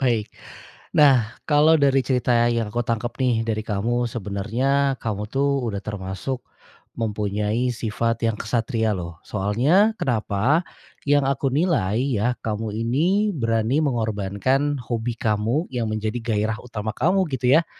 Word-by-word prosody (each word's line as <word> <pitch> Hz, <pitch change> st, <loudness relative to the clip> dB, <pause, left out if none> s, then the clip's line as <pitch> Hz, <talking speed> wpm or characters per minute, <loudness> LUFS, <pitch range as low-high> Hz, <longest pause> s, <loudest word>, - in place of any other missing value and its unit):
Baik, 120 Hz, -5 st, 0 dB, 0.6 s
nah, 130 Hz, -7 st, +4 dB
kalo 155 Hz, +1 st, +5 dB
dari 140 Hz, -2 st, +3 dB
cerita 125 Hz, -1 st, 0 dB, 0.2 s
yang 115 Hz, -3 st, -1 dB
kutangkep 120 Hz, 0 st, -1 dB
nih, 125 Hz, -3 st, +2 dB
dari 110 Hz, -1 st, -1 dB
kamu, 115 Hz, +3 st, -1 dB
sebenarnya 120 Hz, +7 st, 0 dB
kamu 105 Hz, -3 st, -4 dB
tuh 140 Hz, +1 st, +1 dB
udah 100 Hz, -1 st, -4 dB
termasuk, 105 Hz, +5 st, -4 dB, 0.5 s
mempunyai 105 Hz, +2 st, -1 dB
sifat 115 Hz, +1 st, -2 dB
yang 115 Hz, -2 st, 0 dB
ksatria 110 Hz, -1 st, 0 dB
loh, 85 Hz, -3 st, -6 dB
soalnya 130 Hz, -, +2 dB
kenapa? 120 Hz, -, +1 dB, 0.4 s
Yang 145 Hz, -1 st, +3 dB
aku 135 Hz, 0 st, 0 dB
nilai, 140 Hz, -, +1 dB
ya, 125 Hz, -2 st, 0 dB
kamu 110 Hz, 0 st, -3 dB
ini, 170 Hz, -, +1 dB
berani 115 Hz, +4 st, +1 dB
mengorbankan 120 Hz, +4 st, 0 dB
hobi 120 Hz, 0 st, -3 dB
kamu, 115 Hz, -, 0 dB
yang 115 Hz, -3 st, -1 dB
menjadi 110 Hz, +1 st, -2 dB
gairah 110 Hz, -1 st, 0 dB
utama 110 Hz, -3 st, -5 dB
kamu 185 Hz, +7 st, +2 dB
gitu 130 Hz, +4 st, +4 dB
ya, 165 Hz, -, 0 dB
115 Hz, 130 wpm, -23 LUFS, 110-135 Hz, 0.6 s, kalo